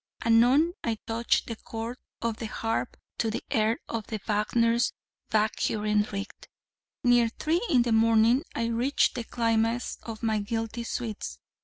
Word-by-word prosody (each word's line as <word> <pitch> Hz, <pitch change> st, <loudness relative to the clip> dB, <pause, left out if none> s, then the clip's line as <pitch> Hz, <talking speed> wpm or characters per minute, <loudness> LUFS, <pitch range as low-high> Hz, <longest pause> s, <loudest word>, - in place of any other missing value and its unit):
Anon 250 Hz, +9 st, +5 dB
I 230 Hz, -2 st, -1 dB
touched 230 Hz, +1 st, +1 dB
the 230 Hz, -, -5 dB
chords 230 Hz, +3 st, -6 dB, 0.2 s
of 230 Hz, -2 st, -1 dB
the 225 Hz, -, -4 dB
harp 225 Hz, +2 st, -2 dB, 0.2 s
to 225 Hz, -, +1 dB
the 220 Hz, -, -3 dB
air 220 Hz, +1 st, +2 dB
of 225 Hz, -2 st, -4 dB, 0.2 s
Wagner's 230 Hz, +3 st, +2 dB, 0.4 s
'Walküren 210 Hz, -1 st, +1 dB
ritt.' 200 Hz, 0 st, -6 dB, 0.6 s
Near 245 Hz, -1 st, +5 dB
three 315 Hz, +8 st, 0 dB
in 255 Hz, -7 st, +5 dB
the 235 Hz, -, -1 dB
morning, 225 Hz, +3 st, +4 dB
I 230 Hz, -, 0 dB
reached 235 Hz, +5 st, +2 dB
the 240 Hz, -, -3 dB
climax 230 Hz, 0 st, 0 dB
of 225 Hz, -1 st, -8 dB
my 220 Hz, -1 st, +1 dB
guilty 225 Hz, +2 st, -3 dB
sweets. 225 Hz, -3 st, -4 dB
230 Hz, 145 wpm, -28 LUFS, 220-240 Hz, 0.6 s, Anon